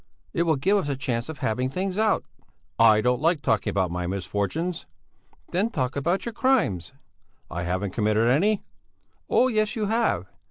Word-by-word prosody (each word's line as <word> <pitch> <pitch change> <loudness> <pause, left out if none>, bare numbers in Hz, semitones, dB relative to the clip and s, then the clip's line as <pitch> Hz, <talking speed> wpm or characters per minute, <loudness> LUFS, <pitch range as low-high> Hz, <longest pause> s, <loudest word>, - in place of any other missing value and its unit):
It 170 - +1
will 160 - +4
give 190 +10 +2
us 160 -7 -1
a 140 - 0
chance 125 -1 -2
of 160 - -6
having 125 +4 0
things 185 +7 -2
out." 220 -1 +2 0.5
"I 110 -2 +6
don't 125 +2 +1
like 165 -1 +2
talking 110 - +1
about 95 -3 0
my 90 0 -3
misfortunes." 100 - -2 0.6
"Then 195 +6 +1
talk 130 - -2
about 170 +7 0
your 235 - -4
crimes!" 155 - +1 0.6
"I 85 - -3
haven't 90 +2 -2
committed 110 +1 +2
any!" 195 - +2 0.7
"Oh, 255 - +4
yes, 215 -3 0
you 215 -2 -1
have! 215 - +1
140 Hz, 170 wpm, -25 LUFS, -, 0.7 s, I